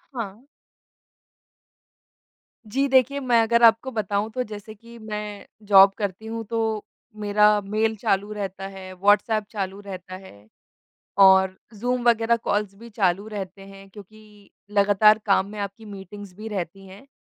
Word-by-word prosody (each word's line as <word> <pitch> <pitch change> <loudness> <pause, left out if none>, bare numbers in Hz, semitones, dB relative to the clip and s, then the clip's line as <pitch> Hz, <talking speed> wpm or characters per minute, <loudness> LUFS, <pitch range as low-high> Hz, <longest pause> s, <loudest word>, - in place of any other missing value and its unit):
हाँ। 225 +1 -6 2.3
जी 275 +3 +1
देखिए, 265 +1 +3
मैं 245 -3 +3
अगर 235 +1 +2
आपको 230 +3 +5
बताऊँ 205 -1 -2
तो 255 +1 -2
जैसे 215 0 -9
कि 235 +2 -15
मैं 210 -1 -6 0.2
जॉब 195 -1 +7
करती 205 0 -4
हूँ 225 0 -5
तो 225 -2 -2 0.4
मेरा 210 0 +4
मेल 215 +2 -1
चालू 205 -2 0
रहता 195 -2 -5
है, 190 -1 -10
व्हाट्सएप 205 +3 +2
चालू 195 -2 -4
रहता 185 -2 -9
है 110 - -14 0.8
और 190 -1 +6 0.2
ज़ूम 245 +3 -2
वगैरह 230 0 +3
कॉल्स 205 -1 -1
भी 235 +3 -13
चालू 200 -2 0
रहते 195 -2 -7
हैं 195 0 -14
क्योंकि 210 0 -16 0.2
लगातार 205 +1 +4
काम 195 -1 +3
में 210 - -9
आपकी 200 +2 -6
मीटिंग्स 200 -1 -10
भी 220 +2 -7
रहती 195 -1 -6
हैं। 195 +8 -14
205 Hz, 145 wpm, -24 LUFS, 195-220 Hz, 2.3 s, जॉब